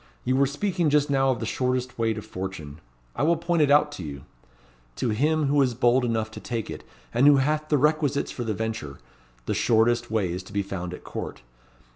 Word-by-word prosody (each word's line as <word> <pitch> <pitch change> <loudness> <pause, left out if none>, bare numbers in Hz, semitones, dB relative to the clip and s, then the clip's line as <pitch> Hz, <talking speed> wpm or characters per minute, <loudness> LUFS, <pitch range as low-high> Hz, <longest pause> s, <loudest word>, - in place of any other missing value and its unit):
You 130 - +1
were 140 +1 +4
speaking 170 +3 0
just 145 0 +2
now 135 -1 +3
of 130 - 0
the 115 - -3
shortest 125 +1 -2
way 115 -1 +2
to 105 - -6
fortune. 85 -6 -7 0.3
I - - -3
will 165 +3 +3
point 170 0 0
it 145 - +4
out 145 +1 +4
to 90 - -7
you. 70 -3 -7 0.7
To 125 - -1
him, 150 +8 +1
who 140 +1 +3
is 125 -3 +1
bold 125 +1 +3
enough 110 -2 -1
to - - -8
take 115 -3 -4
it, - - -8 0.3
and 125 +4 +4
who 145 -1 +7
hath 150 +3 0
the 150 - +3
requisites 150 -1 +1
for 120 - -4
the 110 -2 -2
venture, 110 -11 -4 0.5
the - - -1
shortest 120 +1 +2
way 105 -6 0
is 90 +2 -4
to 95 +2 -14
be 100 0 0
found 90 -2 -5
at - - -14
Court. - - -7
125 Hz, 220 wpm, -25 LUFS, 110-145 Hz, 0.7 s, who